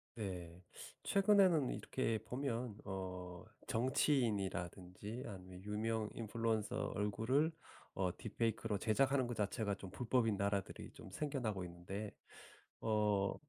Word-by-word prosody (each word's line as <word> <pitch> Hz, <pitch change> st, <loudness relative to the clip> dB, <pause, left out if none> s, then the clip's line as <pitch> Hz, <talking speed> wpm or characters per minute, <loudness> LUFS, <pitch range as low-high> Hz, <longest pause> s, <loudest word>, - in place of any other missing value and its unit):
네. 90 Hz, -5 st, -5 dB, 0.4 s
최근에는 195 Hz, -8 st, +5 dB
이렇게 115 Hz, -4 st, 0 dB
보면 125 Hz, -4 st, -2 dB
어 90 Hz, -2 st, -5 dB, 0.2 s
정치인이라든지 105 Hz, -, +1 dB
아니면 95 Hz, -3 st, -8 dB
유명 110 Hz, +1 st, 0 dB
인플루언서 110 Hz, -1 st, 0 dB
얼굴을 115 Hz, +10 st, +2 dB, 0.4 s
어 90 Hz, -2 st, 0 dB
딥페이크로 110 Hz, -1 st, 0 dB
제작하는 130 Hz, +6 st, +3 dB
것 120 Hz, 0 st, -3 dB
자체가 105 Hz, 0 st, 0 dB
좀 95 Hz, -1 st, -8 dB
불법인 115 Hz, 0 st, +2 dB
나라들이 100 Hz, -1 st, -1 dB
좀 -, -, -11 dB
생겨나고 120 Hz, -7 st, -1 dB
있는데 90 Hz, +4 st, -5 dB, 0.7 s
어 105 Hz, -3 st, +2 dB
105 Hz, 275 characters per minute, -39 LUFS, 95-120 Hz, 0.7 s, 최근에는